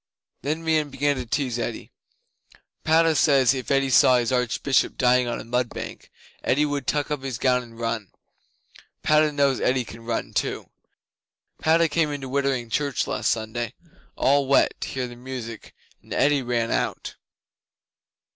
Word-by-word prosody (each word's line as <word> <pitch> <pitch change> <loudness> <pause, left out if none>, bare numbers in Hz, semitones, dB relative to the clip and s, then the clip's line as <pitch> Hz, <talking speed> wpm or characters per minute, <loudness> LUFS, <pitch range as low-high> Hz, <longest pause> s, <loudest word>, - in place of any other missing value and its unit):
'Then 155 +5 -2
Meon 155 -2 +1
began 145 +1 0
to 125 -2 -5
tease 125 -1 -1
Eddi: 115 -1 -5 0.9
"Padda 160 +1 +4
says, 135 -4 +4
if 130 -2 -5
Eddi 135 -1 +2
saw 125 0 +6
his 120 0 0
Archbishop 125 +2 +1
dying 125 -1 +3
on 120 - -3
a - - -7
mud 125 +1 -1
bank - - -8 0.3
Eddi 145 +4 +2
would 145 -3 -3
tuck 145 0 0
up 150 -2 -2
his 135 -4 -4
gown 125 0 +2
and 115 -2 -14
run. 115 -3 -3 0.9
Padda 155 0 +4
knows 140 -2 +2
Eddi 125 -1 +1
can 115 - -11
run 115 0 -3
too! - - -2 0.9
Padda 165 +1 +3
came 160 0 +1
into 140 -2 -5
Wittering 130 -3 -1
Church 140 +1 0
last - - -1
Sunday 115 +1 -3 0.4
all 140 0 +2
wet 140 - +4
to - - -3
hear 130 -1 -3
the 120 - -10
music, 120 -3 -8 0.3
and - - -21
Eddi 145 0 +3
ran 120 -2 -1
out." - - -2
130 Hz, 160 wpm, -24 LUFS, 120-145 Hz, 0.9 s, saw